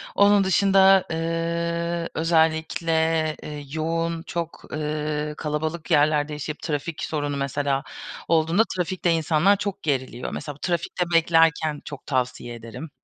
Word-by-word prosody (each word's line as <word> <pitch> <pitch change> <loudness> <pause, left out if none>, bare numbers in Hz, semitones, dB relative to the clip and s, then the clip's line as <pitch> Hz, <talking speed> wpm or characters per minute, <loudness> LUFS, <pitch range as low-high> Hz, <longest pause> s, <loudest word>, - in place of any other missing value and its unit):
Onun 200 0 +5
dışında, 195 0 +5
ııı, 170 +1 -1
özellikle, 160 0 +1
ııı, 150 -1 -6
yoğun, 165 +1 -1
çok, 170 -2 -5
ııı, 150 0 -2
kalabalık 155 +2 -3
yerlerde 150 0 +3
yaşayıp 150 +1 -5
trafik 150 0 -3
sorunu 145 -2 -2
mesela 140 0 -1 0.4
olduğunda 165 +5 +3
trafikte 180 0 0
insanlar 165 +4 +3
çok 200 -1 -4
geriliyor. 130 -4 -2
Mesela 145 -2 -5
bu 145 - -21
trafikte 175 0 -1
beklerken 165 -2 +3
çok 145 - -8
tavsiye 125 -2 -2
ederim 115 +7 -9
160 Hz, 120 wpm, -24 LUFS, 150-170 Hz, 0.4 s, Onun